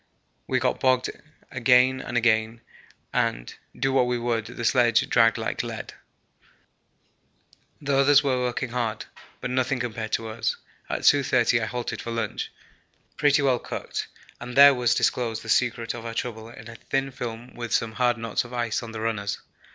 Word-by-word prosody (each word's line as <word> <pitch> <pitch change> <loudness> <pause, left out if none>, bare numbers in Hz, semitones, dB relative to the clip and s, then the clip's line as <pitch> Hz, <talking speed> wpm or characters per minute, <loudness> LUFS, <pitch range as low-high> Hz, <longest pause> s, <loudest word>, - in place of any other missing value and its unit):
We - - +1
got - - 0
bogged 130 -1 +2 0.4
again 125 +1 +4
and 120 - -3
again, 115 0 +1 0.5
and, - - -1 0.3
do 135 +1 +1
what 130 -2 +3
we 125 0 0
would, 115 -2 -1
the 120 - -6
sledge 120 -2 +3
dragged 115 -2 +4
like - - -2
lead. - - -6 1.9
The 140 -2 0
others 140 +1 +5
were 130 -2 +1
working 125 0 -2
hard 115 -3 -2 0.4
but 125 - -3
nothing 130 +1 0
to 120 - 0
be - - -15
compared 110 0 -5
to 115 -1 -1
us. 110 +1 -2 0.3
At - - -2
2.30 125 -4 +3
I - - 0
halted 120 +2 -4
for - - -6
lunch, 115 0 -3 0.6
pretty 145 -1 +3
well 130 -3 +2
cooked, - - -5 0.3
and 125 +1 -7
there 140 +1 +9
was 120 -2 +1
disclosed 115 -3 0
the 115 - -9
secret 120 -1 +1
of 120 - -8
our 115 0 -6
trouble 115 -2 -4
in 115 -1 -12
a 115 - -9
thin 135 +3 -2
film 120 -1 -7
with 120 -1 -6
some 115 - +1
hard 120 +1 +1
knots 115 -1 -1
of 120 0 -12
ice 120 -2 -1
on 115 -2 -8
the 110 - -5
runners. 110 -3 -2
120 Hz, 180 wpm, -25 LUFS, 115-125 Hz, 1.9 s, there